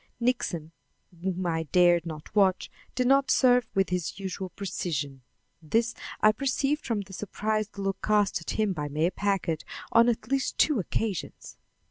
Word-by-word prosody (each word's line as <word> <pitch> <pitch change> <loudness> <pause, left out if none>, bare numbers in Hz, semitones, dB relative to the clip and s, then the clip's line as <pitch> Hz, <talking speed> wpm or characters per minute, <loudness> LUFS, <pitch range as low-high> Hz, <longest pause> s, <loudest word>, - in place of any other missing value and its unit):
Nixon, 185 -10 -1 0.5
whom 185 0 -2
I 165 -2 0
dared 175 +1 +3
not 155 +3 -8
watch, 190 -3 +3 0.2
did 250 - +1
not 275 +2 +4
serve 250 -3 +4
with 195 -1 +2
his 180 +1 -2
usual 190 -1 -4
precision, 150 -8 -4 0.4
this 225 +9 +1 0.3
I 215 - +7
perceived 275 +5 0
from 225 -4 -1
the 195 -1 -11
surprised 215 +2 -2
look 195 -1 -2
cast 210 -4 +2
at 165 - -8
him 210 -3 +2
by 150 -4 -3
Mayor 155 +5 0
Packard 195 -6 -1 0.3
on 230 +1 +6
at 225 0 -2
least 270 -1 0
two 300 -7 +3
occasions. 200 0 -3
195 Hz, 155 wpm, -27 LUFS, 175-225 Hz, 0.5 s, I